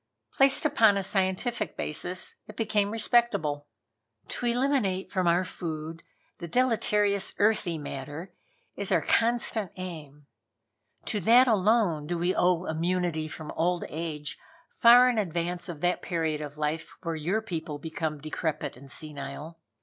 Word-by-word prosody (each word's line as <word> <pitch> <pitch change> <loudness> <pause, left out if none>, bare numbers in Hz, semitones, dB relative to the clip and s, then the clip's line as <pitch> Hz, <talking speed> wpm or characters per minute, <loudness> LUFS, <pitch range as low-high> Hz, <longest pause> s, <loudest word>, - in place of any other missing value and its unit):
Placed 270 +2 +4
upon 220 -8 +4
a 195 - -1
scientific 195 +4 -1
basis 175 +4 -3
it 215 - -11
became 210 -2 +1
respectable. 210 -10 +1 0.6
"To 245 - -3
eliminate 235 -7 0
from 185 -3 0
our 175 +2 +3
food 165 -2 -6 0.4
the 170 - -6
deleterious 210 -2 +2
earthy 205 -5 +2
matter 145 +5 -7 0.4
is - - -1
our - - +3
constant 230 -4 +1
aim. 155 -6 -8 0.8
To 215 - -1
that 235 +7 +6
alone 205 -8 +2
do 175 +1 -2
we 175 +2 +1
owe 180 0 +2
immunity 165 0 -1
from 155 0 -7
old 175 +1 0
age 155 -2 -5 0.3
far 245 +1 +7
in 245 -3 +1
advance 175 -1 -2
of 160 -4 -7
that 180 0 +1
period 160 -3 -2
of 150 0 -7
life 150 +1 -3
when 165 -2 -2
your 175 +8 0
people 160 -7 -4
become 160 0 -4
decrepit 155 -1 -3
and 135 +2 -14
senile. 150 +2 -6
175 Hz, 140 wpm, -28 LUFS, 155-210 Hz, 0.8 s, far